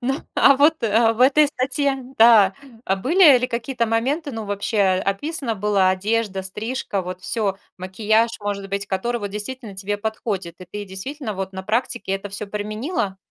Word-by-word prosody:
Ну, 265 +2 -1 0.2
а 275 - +6
вот, 310 +3 +3
а 225 +1 +3
в 225 - -8
этой 285 +4 +6
статье, 275 0 -1 0.2
да, 220 -4 +7 0.3
а 195 - +1
были 295 - +6
ли 250 - -1
какие-то 235 0 -2
моменты, 270 +7 -1
ну, 225 -2 -5
вообще 205 +2 -2 0.2
описана 260 - -2
была 200 -2 +2
одежда, 200 +1 -1
стрижка, 210 +1 -3
вот 180 0 -7
всё, 200 -3 -1 0.2
макияж, 215 +5 +1
может 200 -1 -4
быть, 200 0 -2
который 235 +6 -2
вот 205 - -3
действительно 210 +1 -6
тебе 205 +2 -2
подходит, 205 -5 -4
и 185 - -10
ты 205 +1 -5
действительно 215 +5 -6
вот 190 0 -5
на 190 0 -6
практике 215 -2 -2
это 195 +1 -3
всё 200 +1 -6
применила? 210 - -3
215 Hz, 170 wpm, -22 LUFS, 195-250 Hz, 0.3 s, да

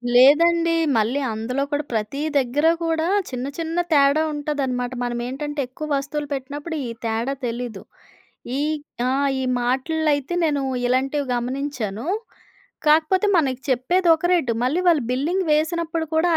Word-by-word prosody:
లేదండి. 330 +6 +5 0.2
మళ్ళీ 225 +6 +1
అందులో 245 +5 -2
కూడా 290 +1 0
ప్రతీ 220 +6 -2 0.2
దగ్గర 275 +4 +1 0.2
కూడా 325 0 0 0.2
చిన్న, 255 -1 -4
చిన్న 330 0 -3 0.2
తేడా 285 +1 +4
ఉంటదన్నమాట. 275 -4 -2
మనం 240 0 -2
ఏంటంటే 295 +3 -4
ఎక్కువ 305 +5 -7
వస్తువులు 290 +2 -4
పెట్టినప్పుడు 290 +4 -5
ఈ - - -5 0.2
తేడా 230 +4 -1
తెలీదు. 235 -3 -4 0.8
ఈ - - 0 0.5
ఆహ్, 275 +2 +1
ఈ - - -1 0.2
మార్ట్‌ల్లో 270 +6 0
అయితే 285 +4 -3
నేను 290 -3 +1 0.2
ఇలాంటివి 270 +3 0
గమనించాను. 245 -2 -3 0.8
కాకపోతే 320 +6 +4
మనకు 265 -6 +1
చెప్పేది 345 +9 +2
ఒక 320 - -1
రేటు 320 -10 +2
మళ్ళీ 290 +8 +1
వాళ్ళు 320 -5 +4
బిల్లింగ్ 320 +9 0
వేసినప్పుడు 325 +1 0
కూడా 320 +2 +3
285 Hz, 135 wpm, -22 LUFS, 250-320 Hz, 0.8 s, లేదండి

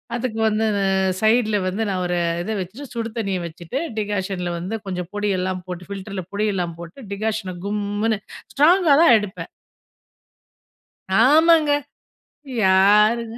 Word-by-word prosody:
அதுக்கு 235 -2 -3
வந்து 220 +1 +1 0.6
சைடுல 220 -1 +3
வந்து 190 +4 -2
நான் 185 -2 -1
ஒரு 175 0 -1 0.2
இத 220 - -4
வச்சுட்டு 215 +11 -7
சுடு 230 -1 -3
தண்ணிய 195 -4 -1
வச்சுட்டு, 170 - -5 0.2
டிகாஷன்ல 190 -4 -2
வந்து 185 +6 -4
கொஞ்சம் 180 -2 -4
பொடியெல்லாம் 185 -3 -1
போட்டு 180 0 -7
ஃபில்டர்ல 195 -1 -6
பொடியெல்லாம் 195 -5 -1
போட்டு 170 +9 -10
டிகாஷன 210 -3 -3
கும்முனு, 205 +1 -1 0.3
ஸ்ட்ராங்கா 320 +2 +5
தான் 335 - +7
எடுப்பேன். 210 -1 -6 1.7
ஆமாங்க. 310 +5 +5 0.9
யாருங்க, 210 +5 +4
205 Hz, 115 wpm, -21 LUFS, 185-225 Hz, 1.7 s, தான்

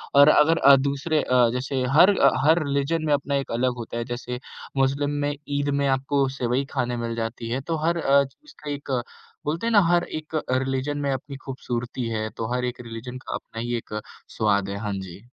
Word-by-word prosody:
और 140 +1 +8
अगर 155 +2 +5
अ, 140 0 +8
दूसरे 140 +3 0
अ, 125 -2 +3
जैसे 130 +1 -2 0.2
हर 190 +4 +7
अ, 140 - +7 0.2
हर 160 +1 +5
रिलिजन 140 +3 0
में 150 - +2
अपना 140 0 0
एक 135 - -2
अलग 125 +2 +1
होता 115 0 -6
है। 120 - -1
जैसे 125 0 -5 0.4
मुस्लिम 140 +2 +2
में 145 0 0 0.2
ईद 145 0 0
में 140 - +2
आपको 135 +1 +1
सेवई 125 0 0
खाने 120 0 -1
मिल 115 -1 -3
जाती 115 0 -4
है। 130 +3 -1
तो 165 +4 -2
हर 170 +1 +2
अ, 140 -3 +4
चीज़ 220 - -14
का 150 - -5
एक 145 0 -6 0.6
बोलते 165 +10 -1
हैं - - +1
ना 215 - +7
हर 175 0 +4 0.2
एक 155 +1 -10 0.2
रिलिजन 135 +2 0
में 140 -1 0
अपनी 135 +1 -4
खूबसूरती 125 -2 -4
है। 110 -1 -2
तो 115 +1 -3
हर 125 0 0
एक 125 0 -4
रिलिजन 120 +2 -7
का - - -3
अपना 115 - -7
ही 120 0 -2
एक 105 -1 -5 0.4
स्वाद 100 -3 +2
है। 100 - -3
हाँ 105 -1 -3
जी। 95 +1 -9
135 Hz, 215 wpm, -24 LUFS, 120-145 Hz, 0.6 s, और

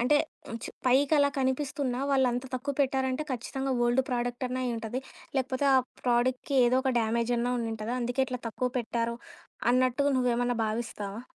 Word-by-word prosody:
అంటే, 270 +5 +4 0.3
హ్మ్ 230 - -5
చ - - -3 0.2
పైకలా 285 +3 +4
కనిపిస్తున్నా 265 -1 -1
వాళ్ళంత 255 -2 +2
తక్కువ 275 +2 -2
పెట్టారంటే 265 +1 +1
ఖచ్చితంగా 265 +2 -2
ఓల్డ్ 240 +2 +3
ప్రాడక్ట్ 245 +1 -1
అన్న 255 +1 -3
అయుంటది. 235 0 -3 0.4
లేకపోతే 265 +1 0
ఆ - - +7 0.3
ప్రాడక్ట్‌కి 250 +3 +1
ఏదో 255 +2 +3
ఒక 265 -1 +1
డ్యామేజ్ 230 +2 0
అన్నా 245 +1 0
ఉండి 230 -1 -2
ఉంటద. 215 +1 -5
అందుకే 245 +2 0
ఇట్లా 250 -1 -4
తక్కువ 250 +3 -1
పెట్టారు 235 0 -1 0.5
అన్నట్టుగా 255 +3 +3
నువ్వేమన్నా 245 -1 +1
భావిస్తావా? 215 -2 -4
250 Hz, 155 wpm, -29 LUFS, 240-265 Hz, 0.5 s, ఆ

